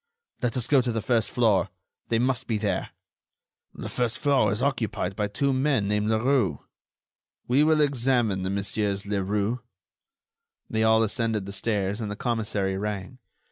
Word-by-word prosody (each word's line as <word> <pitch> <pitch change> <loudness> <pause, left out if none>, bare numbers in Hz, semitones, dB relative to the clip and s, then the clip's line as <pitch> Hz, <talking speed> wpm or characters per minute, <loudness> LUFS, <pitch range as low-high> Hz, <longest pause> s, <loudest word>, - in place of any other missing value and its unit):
"Let 125 0 -1
us 120 - 0
go 135 0 +4
to 125 -1 -1
the 115 -2 -2
first 115 -2 +1
floor. 105 -6 +2 0.4
They 115 - +2
must 125 +1 0
be 110 - 0
there." 105 -3 -1 0.9
"The - - -6
first 120 -2 -1
floor 135 -8 +2
is 105 - -1
occupied 110 -8 -1
by 105 +1 -1
two 135 +7 0
men 130 -5 +1
named 105 +1 0
Leroux." 110 - +2 0.9
"We 130 +4 +4
will 155 0 +4
examine 120 -8 +1
the 95 - -2
Messieurs 100 0 -1
Leroux." 100 +3 -1 1.1
They 110 0 0
all 110 0 +5
ascended 110 -2 -1
the 100 - -6
stairs 100 0 -1
and 105 - -3
the 105 - -4
commissary 105 -5 -1
rang. 105 +4 -4
110 Hz, 160 wpm, -26 LUFS, 100-125 Hz, 1.1 s, all